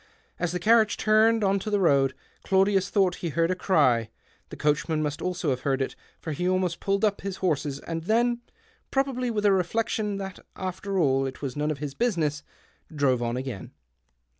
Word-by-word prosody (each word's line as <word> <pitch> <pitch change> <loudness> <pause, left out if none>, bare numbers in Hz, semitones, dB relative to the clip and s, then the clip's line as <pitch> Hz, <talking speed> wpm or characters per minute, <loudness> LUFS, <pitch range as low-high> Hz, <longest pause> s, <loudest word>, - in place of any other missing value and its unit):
As 175 -2 -1
the 180 - -1
carriage 220 +3 +4
turned 220 +1 +3
on 195 0 +2
to 215 - -5
the 205 -1 +1
road, 140 -7 +3 0.3
Claudius 195 0 +2
thought 190 -3 +2
he 170 - -3
heard 165 +3 +1
a - - 0
cry; 130 - +2 0.4
the - - -8
coachman 155 +1 0
must 145 -1 -3
also 180 -4 -1
have 125 - -1
heard 135 0 0
it, 135 - -2 0.2
for 160 - -5
he 180 +5 -1
almost 185 -2 0
pulled 200 +2 +1
up 205 -1 0
his 195 -1 -4
horses, 150 -7 -1
and 165 -1 -5
then 240 +3 +2 0.2
— - - -36
probably 270 -2 0
with 210 -2 -1
a 205 - +6
reflection 205 +2 0
that, 195 -1 -6 0.2
after 190 +1 -4
all, 135 -5 +2
it 130 +2 -8
was 130 -3 -3
none 150 +1 -1
of 155 - -2
his 140 -1 -5
business 155 - 0 0.3
— - - -20
drove 130 -4 +2
on 120 +1 -1
again. 130 -6 -6
180 Hz, 200 wpm, -26 LUFS, 145-200 Hz, 0.4 s, a